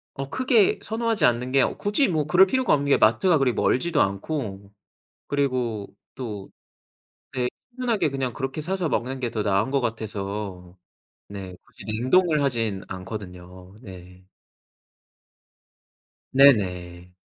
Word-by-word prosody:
어 135 Hz, 0 st, -5 dB
크게 250 Hz, -, +3 dB
선호하지 225 Hz, 0 st, 0 dB
않는 125 Hz, +1 st, +1 dB
게 135 Hz, 0 st, +4 dB
오 -, -, -1 dB
굳이 210 Hz, +7 st, +1 dB
뭐 155 Hz, -4 st, 0 dB
그럴 180 Hz, +5 st, +6 dB
필요가 260 Hz, +6 st, +1 dB
없는 145 Hz, -1 st, +1 dB
게 -, -, +5 dB
마트가 150 Hz, -, +4 dB
그리 135 Hz, -2 st, +3 dB
멀지도 160 Hz, +4 st, +1 dB
않고 100 Hz, -1 st, -3 dB, 0.6 s
그리고 125 Hz, -7 st, -1 dB, 0.3 s
또 105 Hz, -7 st, -6 dB, 0.8 s
네 125 Hz, -1 st, 0 dB, 0.3 s
편하게 225 Hz, -11 st, +1 dB
그냥 135 Hz, -3 st, -3 dB
그렇게 135 Hz, +2 st, -4 dB
사서 180 Hz, +1 st, -1 dB
먹는 130 Hz, +3 st, -2 dB
게 125 Hz, -2 st, -2 dB
더 110 Hz, -, -2 dB
나은 100 Hz, +4 st, +1 dB
거 140 Hz, -1 st, +1 dB
같아서 100 Hz, -5 st, -5 dB, 0.5 s
네 95 Hz, -3 st, -8 dB
굳이 -, -, -15 dB
냉동을 145 Hz, +9 st, +2 dB
하진 115 Hz, -8 st, -1 dB
않거든요. 90 Hz, -1 st, -9 dB
네. 90 Hz, -4 st, -13 dB, 2.1 s
네 140 Hz, +1 st, +9 dB
네. 90 Hz, -5 st, -4 dB
125 Hz, 250 characters per minute, -24 LUFS, 100-150 Hz, 2.1 s, 네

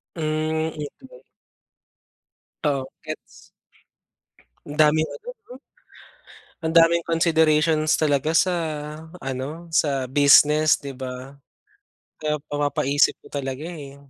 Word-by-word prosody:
Mm. 155 Hz, 0 st, -1 dB, 0.3 s
Mm. -, -, -15 dB, 1.4 s
Oo 135 Hz, -3 st, 0 dB, 0.2 s
gets. -, -, -4 dB, 1.5 s
Ang 150 Hz, +1 st, -8 dB
daming 155 Hz, +1 st, +4 dB
ano 460 Hz, -, -10 dB
'no? 450 Hz, -, -15 dB, 1.1 s
Ang 160 Hz, -, -1 dB
daming 170 Hz, +1 st, +4 dB
considerations 160 Hz, -2 st, +2 dB
talaga 145 Hz, -1 st, +1 dB
sa, 180 Hz, +3 st, +3 dB, 0.6 s
ano 135 Hz, +4 st, -5 dB
sa 140 Hz, -4 st, +1 dB
business, 145 Hz, +3 st, +5 dB
'di 140 Hz, -1 st, -8 dB
ba. 130 Hz, +1 st, -7 dB, 0.9 s
Kaya 150 Hz, -1 st, -1 dB, 0.2 s
mapapaisip 145 Hz, -1 st, +1 dB
ka 145 Hz, -, -6 dB
talaga 135 Hz, +1 st, -5 dB
eh. 150 Hz, -5 st, -8 dB
150 Hz, 100 wpm, -23 LUFS, 140-160 Hz, 1.5 s, business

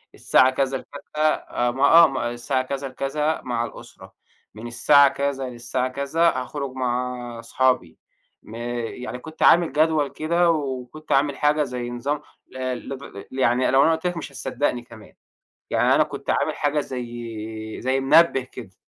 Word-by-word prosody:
الساعة 130 Hz, -, +4 dB
كذا 135 Hz, 0 st, -1 dB
لكذا -, -, -15 dB, 0.2 s
آآ، 150 Hz, -5 st, 0 dB
ما 135 Hz, +3 st, -2 dB
آه، 165 Hz, +3 st, +8 dB
م 135 Hz, -3 st, -5 dB
الساعة 120 Hz, +2 st, -1 dB
كذا 135 Hz, +1 st, -4 dB
لكذا 150 Hz, +4 st, -2 dB
مع 120 Hz, -2 st, -2 dB
الأسرة، -, -, -12 dB, 0.4 s
من 110 Hz, +2 st, -8 dB
الساعة 140 Hz, +4 st, +5 dB
كذا 135 Hz, -2 st, -2 dB
للساعة 125 Hz, +1 st, -2 dB
كذا 140 Hz, +6 st, +1 dB
هاخرج 135 Hz, +1 st, -4 dB
مع 125 Hz, -2 st, -3 dB
صحابي، 115 Hz, -8 st, 0 dB, 0.5 s
م 110 Hz, -, -11 dB
يعني 120 Hz, +1 st, -5 dB
كنت 155 Hz, +4 st, -6 dB
عامل 170 Hz, -3 st, +5 dB
جدول 155 Hz, 0 st, +2 dB
كده 170 Hz, +5 st, +1 dB
وكنت 140 Hz, 0 st, -4 dB
عامل 140 Hz, +1 st, +2 dB
حاجة 150 Hz, 0 st, +2 dB
زي 125 Hz, -3 st, -4 dB
نظام 140 Hz, +5 st, -3 dB, 0.3 s
ل -, -, -10 dB, 0.3 s
لد 135 Hz, 0 st, -6 dB, 0.3 s
ل 130 Hz, -, -6 dB
يعني 125 Hz, 0 st, +2 dB
لو 135 Hz, +1 st, +5 dB
أنا 165 Hz, -, +4 dB
قُلت 160 Hz, +2 st, -1 dB
لَك 175 Hz, -1 st, -3 dB
مش 155 Hz, -, -6 dB
هتصدقني 130 Hz, -1 st, -2 dB
كمان، 115 Hz, -3 st, -15 dB, 0.6 s
يعني -, -, +3 dB
أنا -, -, +5 dB
كنت -, -, -8 dB
عامل -, -, +1 dB
حاجة 145 Hz, +1 st, 0 dB
زي 130 Hz, -4 st, -4 dB, 0.8 s
زي 130 Hz, +2 st, +1 dB
منبّه 150 Hz, +1 st, +5 dB
كده. 120 Hz, -6 st, -11 dB
135 Hz, 160 wpm, -23 LUFS, 125-150 Hz, 0.8 s, آه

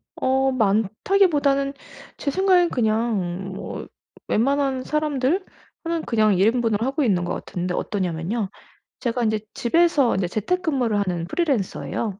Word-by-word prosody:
어 265 Hz, +1 st, +1 dB
많다기보다는 275 Hz, -, +2 dB, 0.4 s
제 280 Hz, -, -2 dB
생각에는 370 Hz, 0 st, +3 dB
그냥 215 Hz, -, -1 dB
뭐 -, -, -6 dB, 0.4 s
웬만한 270 Hz, +2 st, +1 dB
사람들 300 Hz, +4 st, 0 dB, 0.4 s
하는 335 Hz, -1 st, -1 dB
그냥 215 Hz, -3 st, +3 dB
1 195 Hz, -, +4 dB
인분을 225 Hz, -2 st, +1 dB
하고 275 Hz, +4 st, 0 dB
있는 185 Hz, -7 st, +2 dB
것 175 Hz, -, -2 dB
같은데 180 Hz, 0 st, -4 dB
어떠냐면요. 190 Hz, +2 st, -2 dB, 0.5 s
제가 240 Hz, -1 st, -1 dB
인제 220 Hz, -1 st, +1 dB
집에서 295 Hz, -1 st, +3 dB
인제 190 Hz, -2 st, 0 dB
재택근무를 255 Hz, -, 0 dB
하는 180 Hz, -4 st, -1 dB
프리랜서예요. 225 Hz, -, -2 dB
235 Hz, 310 characters per minute, -23 LUFS, 205-285 Hz, 0.5 s, 1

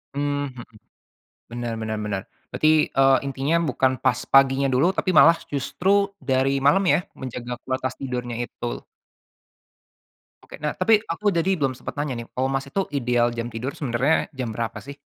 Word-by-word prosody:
Mmm, 145 Hz, -1 st, -2 dB
mhm. 120 Hz, -1 st, -9 dB, 0.8 s
Bener 120 Hz, 0 st, -5 dB
bener 110 Hz, 0 st, -3 dB
bener, 100 Hz, -2 st, -2 dB, 0.3 s
berarti, 155 Hz, 0 st, +3 dB
eee, 135 Hz, 0 st, +4 dB
intinya 140 Hz, +3 st, -1 dB
bukan 130 Hz, 0 st, +2 dB
pas 125 Hz, -4 st, +2 dB
paginya 135 Hz, 0 st, +5 dB
dulu, 135 Hz, +7 st, +3 dB
tapi 185 Hz, -, 0 dB
malah 165 Hz, +2 st, +7 dB
justru 190 Hz, +9 st, +1 dB
dari 135 Hz, +1 st, +1 dB
malam 195 Hz, +7 st, +5 dB
ya, -, -, +4 dB, 0.2 s
menjaga 125 Hz, -1 st, -6 dB
kualitas 130 Hz, -1 st, -2 dB
tidurnya 125 Hz, -3 st, -4 dB
itu. 120 Hz, 0 st, -5 dB, 1.6 s
Oke. -, -, -12 dB
Nah -, -, -2 dB
tapi 220 Hz, -2 st, +4 dB
aku 205 Hz, +5 st, 0 dB
dadi 175 Hz, +3 st, +1 dB
belum 140 Hz, -6 st, 0 dB
sempat 130 Hz, 0 st, -8 dB
nanya 140 Hz, -5 st, -3 dB
nih, 115 Hz, -, -8 dB
kalo 130 Hz, +1 st, +1 dB
Mas 135 Hz, 0 st, -2 dB
itu 195 Hz, +8 st, -1 dB
ideal 120 Hz, -3 st, +1 dB
jam 115 Hz, 0 st, -4 dB
tidur 120 Hz, +4 st, -4 dB
sebenarnya 135 Hz, +2 st, +1 dB
jam 125 Hz, -3 st, -3 dB
berapa 115 Hz, +1 st, -4 dB
sih? 140 Hz, +1 st, -9 dB
135 Hz, 165 wpm, -23 LUFS, 120-145 Hz, 1.6 s, malah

